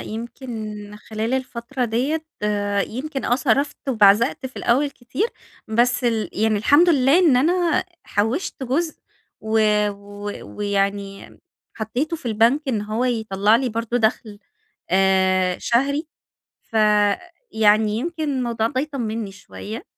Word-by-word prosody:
يمكن 235 +3 -7 0.4
خلال 220 +3 -3
الفترة 255 0 -3
ديّة 270 +8 -1 0.2
آآ، 205 -1 0
يمكن 270 +3 -5
آه، 245 - +2
صرفت 280 +2 +1
وبعزقت 230 +3 +4
في 260 - -13
الأول 275 +5 +1
كتير، 260 - -3 0.4
بس 245 +3 +2
ال 220 -5 0
يعني 215 0 +1
الحمد 290 - +5
لله 280 0 +4
إن 320 -9 +5
أنا 340 +4 +2 0.2
حوشت 230 - -2
جزء، 310 +6 -1 0.4
و 220 0 0 0.3
و 205 0 -8 0.3
ويعني 200 -1 -2 0.4
حطيته 250 +9 -2
في 295 - -11
البنك 230 +6 +3
إن 220 -5 0
هو 215 +4 -2
يطلّع 220 -3 +2
لي 260 +1 -1
برضو 230 +1 -2
دخل 220 -2 0 0.5
آآ، 190 -1 +3
شهري، 280 +6 0 0.6
ف - - -36 0.8
يعني 215 0 +4
يمكن 325 +4 -3
الموضوع 235 -3 0
ده 260 +3 -1
يطمني 230 -8 -4
شوية. 215 - -9
235 Hz, 125 wpm, -22 LUFS, 210-270 Hz, 0.8 s, الحمد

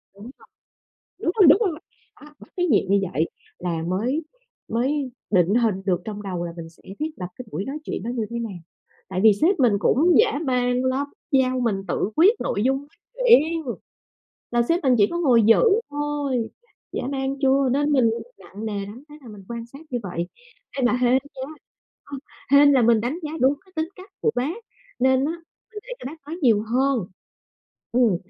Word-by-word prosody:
đúng 210 +5 -11 0.9
rồi, 360 0 +3
đúng 300 - +8
rồi, 350 -8 -1 0.4
đó, 300 - -13
bắt - - -15
cái 355 - +2
nhịp 205 -8 +2
như 200 0 +4
vậy 160 +4 0 0.3
là 170 -2 -2
mới 235 - -1 0.4
mới 260 +3 -1 0.2
định 185 +1 +3
hình 225 -5 +2
được 180 -2 +1
trong 210 -1 -5
đầu 180 -3 -4
là 170 - -5
mình 165 -1 -7
sẽ 165 - -24 0.2
thiết 310 +1 -1
lập 180 -2 -5
cái 255 - -9
buổi 195 - -3
nói 280 +3 -4
chuyện - - -4
nó 235 - -4
như 225 -3 -2
thế 235 0 -4
nào. 215 -6 -5 0.5
Tại 185 -1 -2
vì 215 -2 +8
sếp 330 - +2
mình 240 -5 +4
cũng 320 +12 +3
dã 425 -10 +3
man 250 -1 +1
lắm, 270 +2 0 0.2
giao 255 -1 +2
mình 205 -5 -1
tự 195 - -1
quyết 380 +8 +6
nội 205 - -1
dung 265 +1 +2
nói 285 - -14 0.4
chuyện! 325 -5 +5 0.9
Là 240 0 +2
sếp 335 +8 0
mình 260 -2 +4
chỉ 205 - +6
có 345 - -2
ngồi 245 -8 +4
dự 225 - +5 0.3
thôi, 290 -5 -2 0.4
dã - - -3
man 270 0 -2
chưa? 270 0 +3
Nên 290 +2 +1
mình 245 -5 +4 0.3
nặng 195 +4 -10
nề 200 -2 -3
lắm, 230 +7 -10
thế 300 - -12
là 240 - -12
mình 205 -3 -11
quan 235 0 -6
sát 275 +4 -13
như 245 - -1
vậy. 175 -2 -4 0.5
Ê, 255 - +1
mà 245 - +3
hên 250 0 +2
nha, 265 0 -1 0.6
ờ, 285 -1 -7 0.4
hên 285 0 +7
là 260 -3 +4
mình 225 -1 +4
đánh 260 +9 -2
giá 305 0 -5
đúng 265 +3 +4
cái 375 - -24
tính 315 +1 -1
cách 370 +2 -13
của 450 - +2
bác 280 - -1 0.4
nên 260 +1 +3
á 315 - 0 0.4
mình 420 - -7
để - - -7
cho - - -7
bác 310 +4 -7
nói 325 +3 -5
nhiều 220 -5 +4
hơn, 250 -2 0 0.9
ừm, 235 -7 +3
255 Hz, 205 wpm, -23 LUFS, 215-290 Hz, 0.9 s, đúng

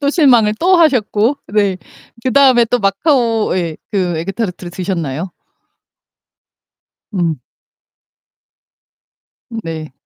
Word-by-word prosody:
또 280 -1 +1
실망을 245 -10 +4
또 365 +2 +4
하셨고 250 -5 +2
네. 200 -2 +1 0.5
그다음에 260 -2 +4
또 245 +2 0
마카오 225 - +1
예 170 -3 -2 0.2
그 180 -4 0
에그 195 +4 -4
타르트를 180 -5 -4
드셨나요? 175 -3 -4 1.8
음. 165 -7 -1 2.1
음 230 -2 -7
네. 160 -3 -6
210 Hz, 190 characters per minute, -16 LUFS, 175-245 Hz, 2.1 s, 실망을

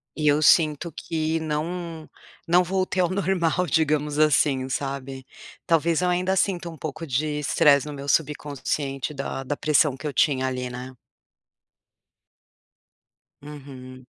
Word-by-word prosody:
E 150 -1 -1
eu 145 +1 +4
sinto 155 +1 +4
que 160 +1 -2
não 160 +1 -4 0.4
não 175 +2 +4
voltei 185 0 0
ao 175 - +2
normal 180 -2 0
digamos, 150 -1 0
assim, 140 -3 +3
sabe? 135 -1 -4 0.4
Talvez 165 0 +2
eu 180 - +1
ainda, 180 +2 +1
sinta 180 -3 0
um 165 - -10
pouco 155 +2 -6
de 150 +3 -1
estresse 145 0 +3
no 150 - -6
meu 140 0 -6
subconsciente 145 -2 -1
da 140 -1 -4
da 145 +2 -3
pressão 150 -2 +2
que 135 - -11
eu 150 - -1
tinha, 130 -1 +2
ali, 125 -1 -3
né? 125 +1 -8 2.5
Uhum. 130 -3 -11
150 Hz, 135 wpm, -24 LUFS, 140-165 Hz, 2.5 s, eu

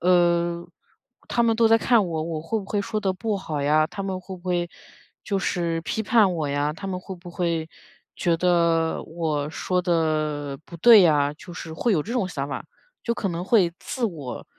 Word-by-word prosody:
呃， 175 -1 +2 0.6
他 235 - +2
们 230 -1 +3
都 230 -1 +4
在 225 0 +6
看 230 -4 +3
我， 160 -2 -2
我 160 -2 -3
会 220 +7 -1
不 200 - -7
会 205 +1 -1
说 215 0 -2
得 195 -2 0
不 215 +2 -2
好 155 -7 -4
呀， 155 +2 +3
他 195 - -6
们 190 -1 -3
会 185 +1 -8
不 175 - -18
会 175 -2 -1 0.6
就 200 - 0
是 170 -3 -1
批 220 - -2
判 210 -4 +4
我 155 -3 -2
呀， 145 +1 0
他 195 +5 -8
们 185 -1 -3
会 190 - -7
不 175 0 -11
会 170 -2 -1 0.5
觉 170 -2 +1
得 170 -2 +2
我 155 -3 -2
说 180 +3 -1
得 155 -4 0
不 170 - -10
对 225 +1 +8
呀， 145 -4 +3
就 175 +3 -12
是 165 -2 -7
会 220 +8 0
有 155 - +2
这 230 - -6
种 235 -7 0
想 140 -5 -4
法。 - - -5 0.4
就 235 - 0
可 200 - -2
能 175 0 -3
会 190 -5 +4
自 250 - -3
我 150 - -5
175 Hz, 220 characters per minute, -24 LUFS, 160-195 Hz, 0.6 s, 对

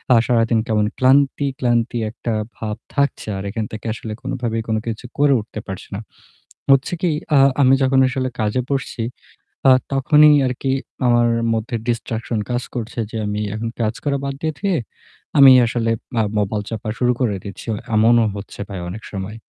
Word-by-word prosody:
আ - - +6
সারাদিন 115 -2 +2
কেমন 105 -1 +2
ক্লান্তি, 140 +2 +3
ক্লান্তি 120 0 +1
একটা 115 +1 -5 0.3
ভাব 105 -1 -4 0.2
থাকছে। 140 -5 0
আর 95 - -5
এখান 110 +1 -3
থেকে 110 +1 -8
আসলে 115 -1 -7
কোনভাবেই 120 -4 -2
কোন 110 - 0
কিছু 115 +2 -4
করে 145 -1 +4
উঠতে 110 0 -7
পারছি 95 -1 -7
না। - - -4 0.7
হচ্ছে 135 +5 +3
কি, 180 - +2 0.3
আ - - +6 0.2
আমি 130 -1 +6
যখন 130 0 +3
আসলে 130 0 -2
কাজে 110 +3 0
বসছি 135 -4 -2 0.7
আ - - +8 0.2
তখনই 150 +3 +6
আর 125 - 0
কি 135 - 0 0.4
আমার 120 0 +4 0.3
মধ্যে 115 +2 -2
distraction 115 -1 -2
কাজ 120 0 -1
করছে, 120 0 -4
যে 115 - -4
আমি 105 0 -2
এখন 110 +2 -3
কাজ 110 0 +1
করা 140 -1 0
বাদ 140 - -2
দিয়ে, 160 0 0
রেখে 200 -1 -1
দিয়ে 140 - 0 0.6
আমি 135 -1 +10
আসলে 115 -1 0 0.2
মা 115 - +3 0.2
মোবাইল 105 +1 -1
চাপা 110 -1 -5
শুরু 125 -1 +3
করে 115 -6 +1
দিচ্ছি। 100 -2 -9
অ - - -2 0.2
এমনও 115 +1 +5
হচ্ছে 100 0 -9
ভাই 95 -3 -5
অনেক 110 +5 -7
সময়। 100 +2 -5
120 Hz, 180 wpm, -20 LUFS, 110-130 Hz, 0.7 s, আমি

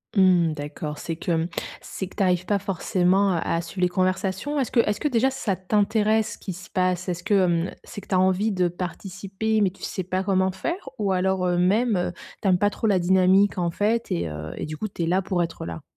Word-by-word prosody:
Mmh, 180 -4 +4
d'accord. 150 0 -5
C'est 165 - -4
que, 170 - -3
hem, 165 0 +1 0.3
c'est 190 - -6
que - - -16
tu 200 - +1
arrives 180 -1 +2
pas 200 0 +1
forcément 190 0 +1
à 170 - +1 0.2
à 165 - 0
suivre 180 +2 -7
les 180 - +3
conversations? 190 +9 -1
Est-ce 255 - -1
que 240 - +3
est-ce 210 -2 -1
que 295 - 0
déjà 260 0 +2
ça 220 -8 -1
t'intéresse 215 +3 +1
ce - - -10
qui 190 - -6
se 180 - -11
passe? 185 0 0
Est-ce 175 0 -3
que, 205 0 0
hem, 175 -3 +2
c'est - - -8
que - - -17
tu 190 - 0
as - - +4
envie 190 +4 +2
de 180 -2 +2
participer, 190 +4 -3
mais 190 -3 +3
tu 195 - -20
sais 185 - -3
pas 185 +1 -2
comment 190 -1 +2
faire? 305 - -4
Ou 200 -2 +1
alors, 185 0 +1
heu, 175 0 +1
même, 210 +5 +3
heu, 175 0 -1 0.3
tu - - +1
aimes 180 -2 +4
pas 205 - +3
trop 225 - -5
la 195 -3 +3
dynamique, 190 +2 +4
en 170 -1 0
fait 220 +5 0
et 85 -1 0
heu 75 +1 -6
et - - -4
du 155 0 -6
coup 215 - -3
tu 180 - -4
es 165 - -1
là 185 +3 +2
pour 185 -2 0
être 165 - -5
là? 85 -1 -6
185 Hz, 250 wpm, -24 LUFS, 175-205 Hz, 0.3 s, Mmh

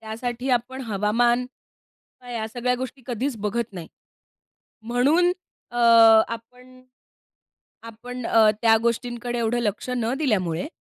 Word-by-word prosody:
त्यासाठी 240 +3 -4
आपण 255 +2 -1
हवामान 235 +5 +1
किंवा 250 -1 -21
या 220 -2 -3
सगळ्या 245 +2 -1
गोष्टी 260 +1 -7
कधीच 250 +1 -3
बघत 235 0 -3
नाही. 170 -3 -8 0.9
म्हणून 280 +10 +2 0.4
अ, 240 - -9 0.5
आपण 250 +2 -10 1.0
आपण 235 +2 -8
अ, 220 -2 +5
त्या 225 -1 +5
गोष्टींकडे 240 +1 -2
एवढं 235 +1 0
लक्ष 210 +2 -3
न 230 +1 -1
दिल्यामुळे, 190 - -1
240 Hz, 115 wpm, -23 LUFS, 225-250 Hz, 1.0 s, अ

